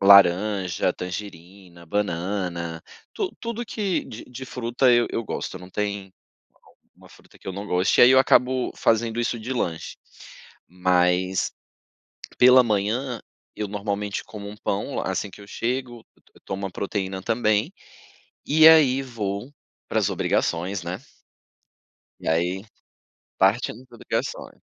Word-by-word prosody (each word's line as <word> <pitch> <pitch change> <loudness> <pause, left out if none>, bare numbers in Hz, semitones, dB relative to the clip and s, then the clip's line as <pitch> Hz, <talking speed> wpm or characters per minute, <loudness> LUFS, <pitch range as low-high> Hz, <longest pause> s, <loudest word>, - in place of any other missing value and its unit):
laranja, 95 -1 +5
tangerina, 90 -1 -8
banana, 85 -3 -2 0.3
tu 390 -3 -2
tudo 235 0 -4
que 205 -5 -2
de 110 - -9
de 125 +1 -9
fruta 125 +1 +1
eu 120 -1 +4
eu 115 - -2
gosto, - - -4
não 90 0 -12
tem 100 -1 -3
u 95 - -31 0.9
uma - - -16
fruta - - -20
que - - -20
eu - - -3
não 100 +2 -6
goste. 90 0 +2
E - - +10
aí 125 - +7
eu 130 - +7
acabo 130 -1 +3
fazendo 115 +1 +1
isso 120 0 -1
de 115 +4 -4
lanche, 85 -10 -3 0.7
mas 90 +1 +1 0.9
pela 125 +1 +8
manhã, 115 +4 -1 0.4
eu 105 -1 -3
normalmente 100 0 -3
como 105 -2 -8
um 105 - -9
pão 100 -1 -2
assim 100 - -2
que - - -14
eu 100 - -12
chego, 120 +3 -3 0.2
eu - - -30
to - - -30
eu - - -18
tomo 95 +1 -4
uma 95 - -3
proteína 95 0 -3
também 110 -1 +1 0.7
e 155 +2 +8
aí 140 -5 +6
vou 115 -1 -4 0.4
para - - 0
as - - +1
obrigações, 90 +3 0
né. 85 +2 -5 1.2
E - - -8
aí 90 +4 0 0.8
partindo 110 +5 +1
pra 120 -2 -16
ligações - - -4
105 Hz, 145 wpm, -24 LUFS, 95-120 Hz, 1.2 s, E